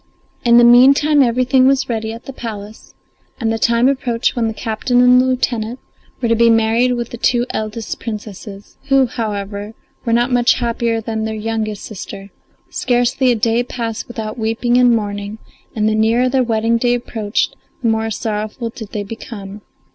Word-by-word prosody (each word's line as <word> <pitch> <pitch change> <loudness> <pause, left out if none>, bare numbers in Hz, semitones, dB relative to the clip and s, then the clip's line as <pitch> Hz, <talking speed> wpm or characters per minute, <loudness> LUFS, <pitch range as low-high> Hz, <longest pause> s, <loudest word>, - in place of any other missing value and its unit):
In 235 -1 +5
the 240 - +7
meantime 275 +5 +6
everything 255 +1 +3
was 270 0 +2
ready 220 -2 -3
at 230 +1 -10
the 270 - -8
palace, 215 -3 -8 0.4
and 225 -2 0
the 225 - -3
time 235 +2 +3
approached 250 -4 0
when 235 -2 0
the 220 - -2
captain 230 +3 0
and 250 0 +6
lieutenant 250 -2 -1 0.4
were 240 - 0
to 230 - +3
be 230 +1 +4
married 230 +2 +3
with 240 -1 -4
the 240 - -7
two 240 0 +2
eldest 215 +1 -4
Princesses, 210 -2 -8
who, 270 -1 +4
however, 210 -3 -5 0.3
were 230 - -2
not 240 +2 +2
much 245 0 +3
happier 230 -1 -1
than 220 0 -3
their 220 0 -3
youngest 215 -1 -3
sister; 200 -1 -9 0.4
scarcely 245 +1 +1
a - - +2
day 230 +2 +1
passed 230 -2 -5
without 220 -1 -6
weeping 225 +2 0
and 250 -1 +5
mourning, 205 -2 -2 0.4
and 215 -1 +1
the 215 - +2
nearer 225 +3 +2
the 260 +1 +2
wedding 230 0 +1
day 245 0 +2
approached 220 -3 -2 0.3
the - - +2
more 225 0 0
sorrowful 215 +2 -4
did 220 -3 -10
they 210 - -2
become. 205 -1 -9
230 Hz, 175 wpm, -17 LUFS, 220-245 Hz, 0.4 s, the